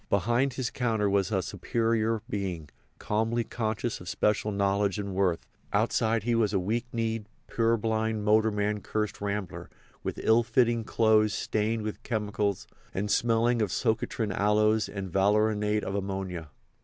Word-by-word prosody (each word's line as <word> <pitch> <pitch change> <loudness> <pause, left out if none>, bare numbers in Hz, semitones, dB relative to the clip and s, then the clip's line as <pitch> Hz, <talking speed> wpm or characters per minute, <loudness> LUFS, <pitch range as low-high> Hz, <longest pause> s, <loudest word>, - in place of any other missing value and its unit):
Behind 120 +7 +2
his 125 -2 -2
counter 110 -5 0
he - - -1
was 100 -3 +1
a - - +1
superior 115 -1 0
being, 90 -7 -4 0.3
calmly 115 +2 0
conscious 110 -1 -3
of 90 - -7
special 105 0 +1
knowledge 100 0 +1
and 100 -2 -4
worth; 95 -3 0 0.3
outside 110 -1 +1
he 120 +1 +1
was 110 -3 +2
a 95 - +2
weak 115 +6 -1
kneed, 115 -2 -2 0.2
purblind, 110 -1 0
motorman 105 -1 +2
cursed 105 0 -3
rambler, 100 -2 -4 0.3
with - - -4
ill 110 +1 +5
fitting 115 0 +2
clothes 110 -2 +3
stained 110 +1 -1
with 105 0 -5
chemicals 105 -3 -1 0.3
and 105 +2 -1
smelling 115 0 +2
of 105 - +1
socotrine 110 0 -1
aloes 105 +2 +2
and 95 -2 -5
valerianate 105 +2 +2
of 95 - -3
ammonia. 95 -5 -4
105 Hz, 145 wpm, -28 LUFS, 100-115 Hz, 0.3 s, ill